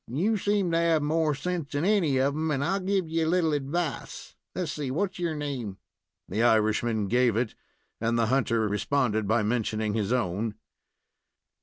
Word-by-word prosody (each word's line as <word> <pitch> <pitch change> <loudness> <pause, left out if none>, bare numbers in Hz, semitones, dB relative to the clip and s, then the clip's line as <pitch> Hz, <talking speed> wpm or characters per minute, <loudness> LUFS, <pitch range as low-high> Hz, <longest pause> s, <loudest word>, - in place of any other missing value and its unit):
You 180 - 0
seem 200 -3 +1
to 165 - +2
have 165 -3 +2
more 155 0 +1
sense 160 0 -3
than 145 +4 0
any 185 -10 +3
of 135 +2 +2
'em, 160 +2 -1
and 140 -2 0
I'll 195 +5 +1
give 190 -2 0
you 160 0 0
a - - +1
little 170 -3 +2
advice. 150 +3 -3 0.2
Let's 180 -4 -2
see, 145 -3 -4
what's 185 +7 -2
your 170 -3 -1
name?" 130 -10 -4 0.5
The 105 +5 -1
Irishman 110 -1 +2
gave 120 0 +3
it, 115 0 0 0.5
and 115 +1 0
the 115 - +3
hunter 115 -2 +1
responded 110 0 0
by 110 +1 +2
mentioning 110 -1 -1
his 105 -1 -1
own. 110 -2 -1
140 Hz, 175 wpm, -27 LUFS, 115-165 Hz, 0.5 s, any